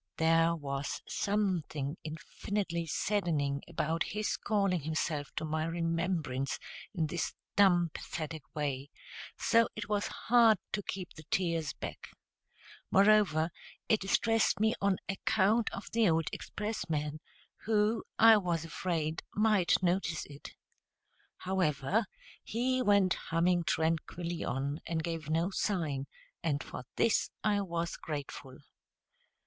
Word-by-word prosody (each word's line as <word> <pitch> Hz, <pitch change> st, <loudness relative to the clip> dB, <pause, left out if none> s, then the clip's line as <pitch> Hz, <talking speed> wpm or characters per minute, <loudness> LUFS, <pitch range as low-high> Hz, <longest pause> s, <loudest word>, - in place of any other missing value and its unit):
There 165 Hz, +1 st, +4 dB
was 140 Hz, -2 st, -3 dB
something 175 Hz, -8 st, -1 dB
infinitely 170 Hz, +2 st, -3 dB
saddening 155 Hz, -6 st, 0 dB
about 160 Hz, +2 st, -1 dB, 0.2 s
his 215 Hz, -, 0 dB
calling 195 Hz, -4 st, +1 dB
himself 155 Hz, -1 st, -2 dB
to -, -, -2 dB
my 155 Hz, 0 st, -1 dB
remembrance 165 Hz, -5 st, -1 dB, 0.3 s
in 170 Hz, -5 st, 0 dB
this 165 Hz, +1 st, -2 dB, 0.2 s
dumb 175 Hz, -4 st, +5 dB
pathetic 160 Hz, -1 st, -5 dB
way, 140 Hz, -2 st, -2 dB, 0.5 s
so 230 Hz, 0 st, +4 dB
it 210 Hz, -1 st, -5 dB
was 205 Hz, -1 st, 0 dB, 0.2 s
hard 230 Hz, -3 st, +7 dB
to 205 Hz, -, -1 dB
keep 185 Hz, -2 st, -5 dB
the 155 Hz, -, -12 dB
tears 165 Hz, -4 st, 0 dB
back. -, -, -7 dB, 0.8 s
Moreover, 195 Hz, -5 st, +4 dB, 0.4 s
it 215 Hz, -, +4 dB
distressed 225 Hz, +1 st, +2 dB
me 220 Hz, +1 st, +3 dB
on 200 Hz, -2 st, +2 dB
account 210 Hz, +3 st, +2 dB
of -, -, -6 dB
the 225 Hz, -4 st, +4 dB
old 160 Hz, -1 st, +1 dB
expressman, 155 Hz, -8 st, -3 dB, 0.5 s
who, 215 Hz, 0 st, +2 dB
I 225 Hz, -1 st, +8 dB
was 170 Hz, -5 st, -1 dB
afraid, 165 Hz, -1 st, -2 dB
might 210 Hz, -4 st, +3 dB
notice 175 Hz, -3 st, 0 dB
it. 145 Hz, 0 st, -11 dB, 0.8 s
However, 185 Hz, -, 0 dB, 0.4 s
he 255 Hz, +3 st, 0 dB
went 200 Hz, -5 st, +4 dB
humming 170 Hz, +1 st, +1 dB
tranquilly 165 Hz, +2 st, -1 dB
on, 140 Hz, +4 st, -2 dB
and 160 Hz, -1 st, -1 dB
gave 165 Hz, -2 st, -4 dB
no 165 Hz, +4 st, +1 dB
sign; 155 Hz, -10 st, -1 dB, 0.3 s
and 150 Hz, -3 st, 0 dB
for 130 Hz, -, -8 dB
this 230 Hz, -, +2 dB
I 205 Hz, -1 st, +2 dB
was 170 Hz, -3 st, -3 dB
grateful. 140 Hz, -3 st, -6 dB
170 Hz, 120 wpm, -32 LUFS, 155-205 Hz, 0.8 s, I